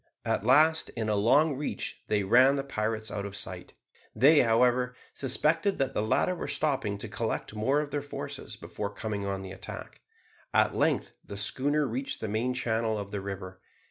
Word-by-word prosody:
At - - 0
last, 155 +7 +4
in 110 -1 -1
a 105 - +2
long 135 +9 +4
reach, 145 +3 -4
they 105 -1 +1
ran 130 +7 +5
the 135 - -1
pirates 110 -4 -2
out 100 - -3
of 100 -1 -6
sight. - - -6 0.4
They, 145 +7 +6
however, 125 +2 +3 0.2
suspected 155 - +1
that 135 0 0
the - - 0
latter 110 +11 +1
were 175 - -5
stopping 130 -9 0
to 105 - -6
collect 110 0 -3
more 130 +7 +1
of 145 -1 -6
their 145 - -1
forces 145 - -7
before 100 - -5
coming 100 -1 -4
on 95 -1 -2
to 95 - -7
the - - -8
attack. 95 - -9 0.5
At - - +3
length - - +1
the 100 - -8
schooner 145 +7 +1
reached 130 +3 -3
the 110 - -3
main 115 +5 -1
channel 115 -3 0
of 100 -1 -6
the 100 -1 -3
river. 95 -1 -7
115 Hz, 190 wpm, -29 LUFS, 105-140 Hz, 0.5 s, They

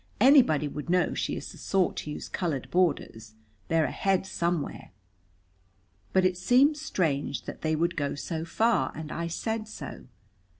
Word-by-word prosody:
"Anybody 245 - +6
would 150 +2 -6
know 180 0 +2
she - - -2
is - - -6
the - - -13
sort 190 -2 +1
to - - -4
use 150 - -6
colored 155 -8 -3
borders. 140 -11 0 0.3
They're 165 -1 +2
ahead 195 -1 0
somewhere." 170 -4 -2 1.2
But 190 -1 +3
it 185 -1 +2
seemed 255 +10 +4
strange 160 - -1
that - - -8
they 155 0 +1
would 170 +2 0
go 140 -2 -1
so 160 +2 -4
far, 210 - +1
and 155 0 -6
I 170 0 -3
said 220 +6 -3
so. 220 - -8
170 Hz, 160 wpm, -28 LUFS, 155-195 Hz, 1.2 s, Anybody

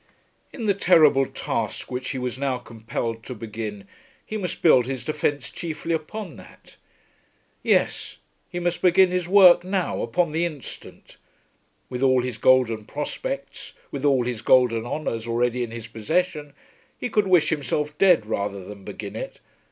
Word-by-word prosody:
In 230 - -6
the 205 - +3
terrible 155 -8 +5
task - - -4
which 130 +1 -3
he - - -3
was 125 0 -4
now 135 -2 0
compelled 115 -1 -5
to 125 - -6
begin 105 -2 -6 0.4
he 215 - -6
must 190 -4 -4
build 130 -7 +6
his 130 -2 -4
defence 145 -3 -1
chiefly 165 0 -4
upon 165 +2 -5
that. - - -16 0.9
Yes; - - 0 0.3
he 175 - -4
must 175 0 -1
begin 180 0 +5
his 180 -2 -1
work, 185 -2 +7
now, 185 -1 -1
upon 175 -3 0
the 165 +2 0
instant. 155 -7 -8 0.7
With 125 0 -5
all 130 -2 +4
his 125 -3 -5
golden 115 -4 +3
prospects, - - -5 0.2
with 140 -1 -5
all 135 -4 +3
his 120 -3 -3
golden 120 -2 +3
honours 120 -6 -3
already 120 +1 0
in 120 - -2
his 115 -1 -7
possession, 150 +7 -2 0.4
he - - -3
could 210 -4 +1
wish 180 -4 +4
himself 150 0 -2
dead 180 - +5
rather 100 -3 -3
than 100 -1 -10
begin - - -7
it. - - -6
135 Hz, 160 wpm, -24 LUFS, 120-175 Hz, 0.9 s, work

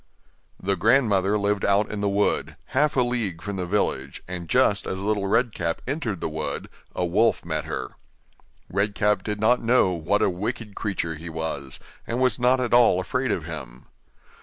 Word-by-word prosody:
The 100 +1 0
grandmother 105 -2 +3
lived 100 0 0
out 100 +1 +2
in 105 - -4
the 100 0 +1
wood, 100 +1 0 0.2
half 150 +2 +3
a 130 - +4
league 115 -8 -2
from 100 -1 -4
the 90 -1 -3
village, 70 -9 -1
and 90 -2 -6
just - - +3
as 95 - -3
Little 100 0 0
Red 115 +2 +2
Cap 85 -1 -2
entered 125 - -2
the - - -1
wood, 80 0 -4 0.3
a 90 - 0
wolf 105 +5 +2
met 80 -1 -2
her. 75 -4 -4 0.8
Red 100 +2 0
Cap 105 -2 +2
did 105 +1 -4
not 115 +4 +3
know 115 -5 +3
what 85 +4 +1
a - - +4
wicked 105 +3 -4
creature 95 -5 -2
he 85 +2 -8
was, 80 -4 -4 0.3
and 120 - -2
was 130 0 +2
not 125 +1 +4
at 125 -2 -1
all 120 -7 +6
afraid 130 +7 -1
of 85 - -2
him. 70 -7 -8
100 Hz, 185 wpm, -25 LUFS, 85-115 Hz, 0.8 s, all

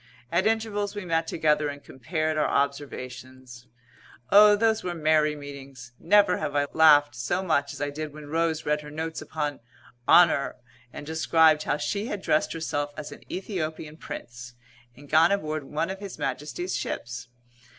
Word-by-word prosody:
At 185 +4 +2
intervals 215 -2 -1
we 205 -2 -5
met 165 -1 0
together 150 -1 +1
and 145 0 -8
compared 155 +4 -3
our 155 - +1
observations. 130 -3 -4 0.6
Oh, 210 +1 +8
those 220 +1 +1
were 175 -1 -3
merry 155 -1 +2
meetings! 140 -4 -10
Never 200 0 +4
have 145 -2 -4
I 145 0 +2
laughed 145 -2 +6
so 150 +10 -2
much 140 -6 +1
as 145 - -9
I 145 - -2
did 155 +1 -5
when 150 0 -11
Rose 160 +1 -1
read 150 0 0
her 150 - -10
notes 160 +2 -5
upon 150 -2 -4 0.5
"Honour" 160 -6 +5 0.4
and - - -8
described 160 0 +3
how - - 0
she 205 +7 -2
had 205 -4 -5
dressed 155 - +1
herself 145 -3 -3
as 150 -1 -7
an - - -11
Æthiopian 160 -5 -5
Prince 120 0 -9 0.4
and 145 +2 -15
gone 160 +6 +5
aboard 155 -7 -2
one 155 +6 -2
of 190 - -7
His 200 -2 -8
Majesty's 155 +6 -3
ships. 125 +1 -5
155 Hz, 165 wpm, -26 LUFS, 145-175 Hz, 0.6 s, Oh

